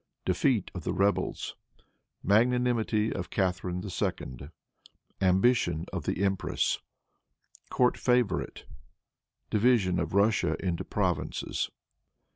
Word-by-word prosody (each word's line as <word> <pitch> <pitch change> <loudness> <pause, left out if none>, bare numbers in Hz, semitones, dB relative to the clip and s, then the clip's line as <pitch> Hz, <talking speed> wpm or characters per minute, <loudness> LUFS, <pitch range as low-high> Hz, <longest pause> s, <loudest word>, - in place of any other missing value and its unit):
Defeat 100 +3 +1
of 90 - -6
the - - -1
Rebels. 100 +1 0 0.7
Magnanimity 115 0 +2
of 90 -3 -5
Catharine 90 -2 -1
II. 70 -7 -4 0.7
Ambition 95 -3 +3
of - - -3
the 95 - -1
Empress. 95 -1 0 0.9
Court 125 -1 +2
Favorite. 125 -3 0 0.9
Division 105 -5 +3
of 85 +2 -2
Russia 105 +2 +3
into 90 -3 -2
Provinces. - - -2
100 Hz, 90 wpm, -29 LUFS, 90-115 Hz, 0.9 s, Ambition